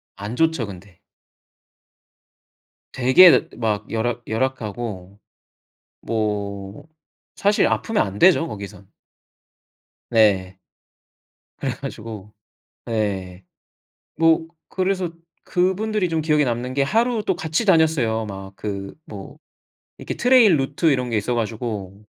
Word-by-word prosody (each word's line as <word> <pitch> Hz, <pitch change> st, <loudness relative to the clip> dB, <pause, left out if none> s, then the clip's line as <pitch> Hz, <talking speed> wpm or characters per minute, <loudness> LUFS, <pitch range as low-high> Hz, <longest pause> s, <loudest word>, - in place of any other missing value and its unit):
안 105 Hz, +4 st, -6 dB
좋죠 160 Hz, -4 st, +1 dB
근데. 95 Hz, -1 st, -12 dB, 1.9 s
되게 155 Hz, +7 st, +6 dB
막 105 Hz, -3 st, -2 dB
열악 120 Hz, +2 st, -2 dB
-열악하고. 110 Hz, -5 st, -4 dB, 0.9 s
뭐 105 Hz, +2 st, -3 dB, 0.5 s
사실 205 Hz, +1 st, +2 dB
아프면 225 Hz, -, 0 dB
안 100 Hz, +1 st, -7 dB
되죠 175 Hz, -, +5 dB
거기선. 100 Hz, -4 st, -9 dB, 1.2 s
네. 100 Hz, -5 st, +3 dB, 1.0 s
그래가지고 105 Hz, -2 st, -6 dB, 0.6 s
예 95 Hz, -5 st, -3 dB, 0.8 s
뭐 165 Hz, 0 st, +3 dB, 0.2 s
그래서 185 Hz, -2 st, -1 dB, 0.3 s
그분들이 190 Hz, +2 st, 0 dB
좀 165 Hz, -1 st, -1 dB
기억에 150 Hz, -1 st, +2 dB
남는 125 Hz, 0 st, -2 dB
게 140 Hz, +1 st, +1 dB
하루 225 Hz, -, +1 dB
또 190 Hz, -3 st, -1 dB
같이 160 Hz, +6 st, -2 dB
다녔어요. 155 Hz, -, +3 dB
막 95 Hz, -1 st, -8 dB
그 100 Hz, -2 st, -5 dB
뭐 100 Hz, -2 st, -10 dB, 0.6 s
이렇게 -, -, -6 dB
트레일 240 Hz, -8 st, +5 dB
루트 140 Hz, +4 st, -1 dB
이런 125 Hz, -2 st, 0 dB
게 115 Hz, -, -1 dB
있어 115 Hz, +4 st, -1 dB
가지고 105 Hz, -3 st, -4 dB
120 Hz, 205 characters per minute, -22 LUFS, 100-160 Hz, 1.9 s, 되게